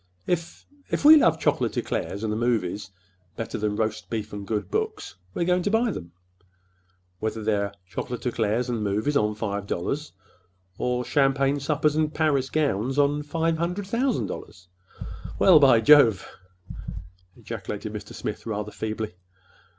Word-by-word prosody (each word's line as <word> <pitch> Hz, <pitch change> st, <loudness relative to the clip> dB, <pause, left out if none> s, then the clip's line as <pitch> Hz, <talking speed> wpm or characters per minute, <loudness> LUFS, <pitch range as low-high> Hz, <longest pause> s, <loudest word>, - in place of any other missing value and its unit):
If—if 230 Hz, -, -4 dB
we 310 Hz, +1 st, +11 dB
love 300 Hz, -, +4 dB
chocolate -, -, 0 dB
eclairs 100 Hz, -, -2 dB
and 110 Hz, -1 st, -1 dB
the -, -, -2 dB
movies 105 Hz, -4 st, -1 dB, 0.5 s
better 115 Hz, -2 st, -4 dB
than 105 Hz, 0 st, -1 dB
roast 110 Hz, 0 st, -2 dB
beef 110 Hz, -2 st, -4 dB
and 100 Hz, -1 st, -6 dB
good 105 Hz, -3 st, -2 dB
books, -, -, -2 dB, 0.2 s
we're 170 Hz, -, 0 dB
going 180 Hz, +1 st, +2 dB
to 205 Hz, -, 0 dB
buy 225 Hz, +2 st, +2 dB
them, 85 Hz, -, -7 dB, 1.1 s
whether 110 Hz, 0 st, -3 dB
they're 100 Hz, -2 st, 0 dB
chocolate 120 Hz, +7 st, -5 dB
eclairs 115 Hz, 0 st, 0 dB
and 120 Hz, -3 st, -2 dB
movies 105 Hz, +8 st, 0 dB
on 105 Hz, -4 st, +2 dB
five 100 Hz, -2 st, -3 dB
dollars, 145 Hz, -, -3 dB, 0.7 s
or 125 Hz, 0 st, 0 dB
or—champagne 135 Hz, +2 st, +2 dB
suppers 150 Hz, +1 st, +1 dB
and 155 Hz, -1 st, 0 dB
Paris 140 Hz, -4 st, +1 dB
gowns 135 Hz, -4 st, 0 dB
on 145 Hz, +1 st, +3 dB
five 160 Hz, +2 st, -1 dB
hundred 180 Hz, +4 st, -2 dB
thousand 235 Hz, +4 st, 0 dB
dollars!" 90 Hz, -3 st, -9 dB, 0.7 s
"Well, 180 Hz, -5 st, +7 dB
by—by 130 Hz, -5 st, +6 dB
Jove!" 115 Hz, -7 st, +6 dB, 1.1 s
ejaculated -, -, -6 dB
Mr. -, -, -8 dB
Smith, -, -, -5 dB
rather 105 Hz, -1 st, -3 dB
feebly. 110 Hz, -2 st, -4 dB
125 Hz, 145 wpm, -25 LUFS, 105-150 Hz, 1.1 s, we